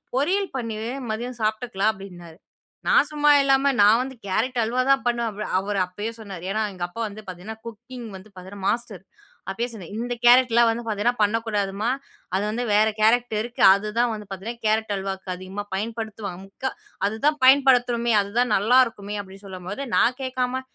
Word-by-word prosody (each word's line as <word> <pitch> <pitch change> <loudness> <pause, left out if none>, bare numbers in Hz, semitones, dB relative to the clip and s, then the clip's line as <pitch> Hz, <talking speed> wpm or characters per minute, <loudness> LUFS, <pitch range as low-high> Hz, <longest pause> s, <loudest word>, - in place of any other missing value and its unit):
பொரியல் 375 +9 +1
பண்ணிரு 225 -2 -4 0.2
மதியம் 240 +2 -5
சாப்பிட்டுக்கலாம்." 215 -1 0
அப்பிடின்னாரு. 175 -5 -11 0.5
நான் - - +5
சும்மா 295 0 +2
இல்லாம 270 0 +3
நான் 210 +3 +6
வந்து 265 +1 -5
கேரட் 225 +6 -1
அல்வா 240 +3 0
தான் 275 -1 +4
பண்ணுவேன். 235 -1 0
அவ் 210 - -4
அவரு 200 +1 -2
அப்பயே 205 +5 -5
சொன்னாரு. 195 -5 -8
ஏன்னா 215 +2 0
எங்க 180 -2 -6
அப்பா 175 +6 -11
வந்து 210 +1 -9
பார்த்தீங்கன்னா, 185 +5 -8
குக்கிங் 235 +2 -9
வந்து 190 +2 -11
பார்த்தீங்கன்னா 190 +1 -9
மாஸ்டர். 230 -6 -3 0.5
அப்பயே 230 +5 -2
சொன்னேன் 200 -7 -10
''இந்த 245 +2 -2
கேரட்லாம் 240 -1 +6
வந்து 230 +1 -2
பார்த்தீங்கன்னா, 225 +2 0
பண்ணக்கூடாதும்மா! 210 -1 0 0.5
அது 195 - +1
வந்து 230 +3 -2
வேற 210 +1 +5
கேரக்ட 235 +2 +3
இருக்கு. 240 +2 -6
அதுதான் 215 +4 0
வந்து 210 -1 -7
பார்த்தீங்கன்னா 220 +5 -7
கேரட் 215 0 +1
அல்வாக்கு 190 0 -5
அதிகமா 190 +3 -6
பயன்படுத்துவாங்க. 215 -3 -5
முக்கா 260 +7 -4 0.4
அதுதான் 280 +9 0
பயன்படுத்தணுமே. 245 -3 +4
அதுதான் 220 +3 0
நல்லாருக்குமே. 215 -2 +2
அப்பிடின்னு 195 +1 -14
சொல்லும்போது 190 +6 -6
நான் 250 +1 +3
கேட்காம 255 0 -2
220 Hz, 160 wpm, -24 LUFS, 200-245 Hz, 0.5 s, நான்